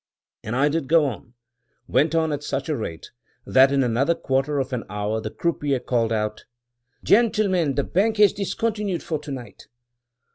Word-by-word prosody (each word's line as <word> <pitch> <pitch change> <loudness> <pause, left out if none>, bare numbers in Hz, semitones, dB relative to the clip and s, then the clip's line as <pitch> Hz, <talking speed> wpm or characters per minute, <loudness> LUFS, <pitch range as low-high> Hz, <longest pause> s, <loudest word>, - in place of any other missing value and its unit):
And 110 - -4
I 140 +3 +3
did 150 -2 -1
go 160 0 +4
on 120 -2 -6 0.3
— - - -51 0.2
went 160 +2 +2
on 160 -1 +1
at 145 - -3
such 140 0 -3
a 155 - +1
rate, 85 - -6 0.3
that 135 +1 +5
in 140 -1 +2
another 130 +7 +1
quarter 135 +1 -1
of 135 -1 -2
an 120 - -2
hour 105 +2 -2
the 110 - -4
croupier 145 0 -1
called 115 -2 0
out, 105 -1 -2 0.6
"Gentlemen, 200 - +2
the 140 - +1
bank 215 +8 +1
has 210 -2 +5
discontinued 205 -2 -2
for 155 -3 -3
to 150 -1 -9
night." 125 -6 -9
140 Hz, 180 wpm, -23 LUFS, 125-170 Hz, 0.6 s, that